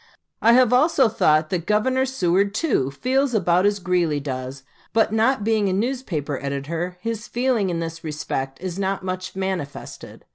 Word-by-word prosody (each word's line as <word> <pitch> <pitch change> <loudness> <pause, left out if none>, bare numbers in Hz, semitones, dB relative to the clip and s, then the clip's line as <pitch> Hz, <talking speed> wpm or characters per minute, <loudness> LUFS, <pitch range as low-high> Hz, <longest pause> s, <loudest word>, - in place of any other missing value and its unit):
I 230 - +6
have 250 -1 +5
also 280 0 +4
thought 155 -7 +2
that 175 -3 -2
Governor 260 +5 +2
Seward, 200 -4 +1
too, 220 - +1
feels 255 - 0
about 180 -1 +3
as 205 0 +1
Greeley 175 -5 0
does; 130 -1 -5 0.3
but 220 -1 +2
not 225 +1 +2
being 215 -2 +2
a - - 0
newspaper 195 - -2
editor, 160 +6 -3
his 230 +1 -4
feeling 240 -5 0
in 170 -1 -2
this 165 0 -6
respect 135 -3 -4
is 185 0 -5
not 195 -1 -2
much 185 0 -4
manifested. 190 -7 -5
190 Hz, 160 wpm, -22 LUFS, 165-230 Hz, 0.3 s, I